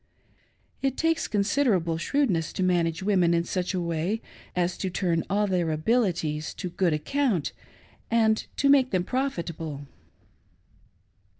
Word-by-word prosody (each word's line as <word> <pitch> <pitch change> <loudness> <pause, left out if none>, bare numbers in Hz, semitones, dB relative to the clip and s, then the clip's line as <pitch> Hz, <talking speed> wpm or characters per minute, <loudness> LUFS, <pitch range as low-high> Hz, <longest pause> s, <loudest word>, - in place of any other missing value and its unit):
It 270 -1 0
takes 325 0 +1
considerable 200 -6 +1
shrewdness 190 - 0
to 190 - -1
manage 170 -1 +1
women 185 -4 +3
in 170 - +2
such 185 +2 -2
a - - 0
way 170 +5 -1 0.4
as 180 0 0
to 190 - -1
turn 170 -2 0
all 205 +2 +2
their 180 -4 0
abilities 160 -4 0
to 180 - -5
good 175 0 +1
account 200 - 0 0.6
and 220 -1 +2
to 280 - +2
make 275 -2 +5
them 185 -5 +1
profitable. 170 - -3
185 Hz, 130 wpm, -26 LUFS, 165-225 Hz, 0.6 s, make